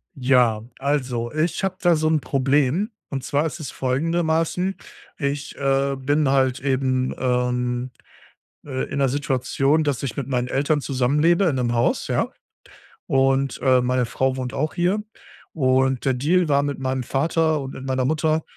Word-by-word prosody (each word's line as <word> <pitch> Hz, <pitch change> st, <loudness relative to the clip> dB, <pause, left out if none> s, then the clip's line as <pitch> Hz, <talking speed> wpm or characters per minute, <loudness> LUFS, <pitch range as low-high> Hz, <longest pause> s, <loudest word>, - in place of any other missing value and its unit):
Ja, 125 Hz, -4 st, +3 dB, 0.2 s
also, 130 Hz, -4 st, -1 dB
ich 160 Hz, +4 st, -1 dB
habe 190 Hz, -1 st, -1 dB
da 175 Hz, -2 st, +4 dB
so 155 Hz, 0 st, 0 dB
'n 155 Hz, -1 st, +2 dB
Problem 140 Hz, -, +1 dB, 0.2 s
und 135 Hz, -2 st, -3 dB
zwar 145 Hz, +3 st, 0 dB
ist 160 Hz, +1 st, -4 dB
es 140 Hz, -, -6 dB
folgendermaßen: 165 Hz, +6 st, 0 dB, 0.4 s
Ich, 140 Hz, -1 st, -3 dB
äh, 135 Hz, 0 st, +1 dB
bin 145 Hz, +3 st, +1 dB
halt 130 Hz, -2 st, +2 dB
eben, 130 Hz, -1 st, 0 dB
ähm, 125 Hz, 0 st, -1 dB, 0.8 s
äh, 130 Hz, -2 st, -2 dB
in -, -, -3 dB
'ner 135 Hz, -, +3 dB
Situation, 135 Hz, +2 st, +1 dB
dass 140 Hz, -3 st, -1 dB
ich 130 Hz, -5 st, -4 dB
mit 135 Hz, -3 st, -3 dB
meinen 125 Hz, -2 st, -1 dB
Eltern 145 Hz, +3 st, +1 dB
zusammenlebe 150 Hz, +8 st, +2 dB
in 160 Hz, -6 st, +1 dB
'nem 120 Hz, -2 st, 0 dB
Haus, 120 Hz, 0 st, +1 dB
ja? -, -, 0 dB, 0.8 s
Und, 135 Hz, 0 st, +1 dB
äh, 130 Hz, -2 st, +4 dB
meine 125 Hz, 0 st, +1 dB
Frau 130 Hz, +2 st, 0 dB
wohnt 125 Hz, -1 st, -4 dB
auch 155 Hz, +3 st, -2 dB
hier. 180 Hz, +4 st, +1 dB, 0.5 s
Und 130 Hz, -2 st, +1 dB
der 135 Hz, -, +3 dB
Deal 165 Hz, +8 st, +2 dB
war, 140 Hz, -1 st, +3 dB
mit 145 Hz, 0 st, -2 dB
meinem 130 Hz, 0 st, -2 dB
Vater 160 Hz, +4 st, +1 dB
und 135 Hz, 0 st, -7 dB
mit 130 Hz, -, -8 dB
meiner 130 Hz, -1 st, 0 dB
Mutter, 155 Hz, +2 st, +1 dB
135 Hz, 165 wpm, -22 LUFS, 130-155 Hz, 0.8 s, da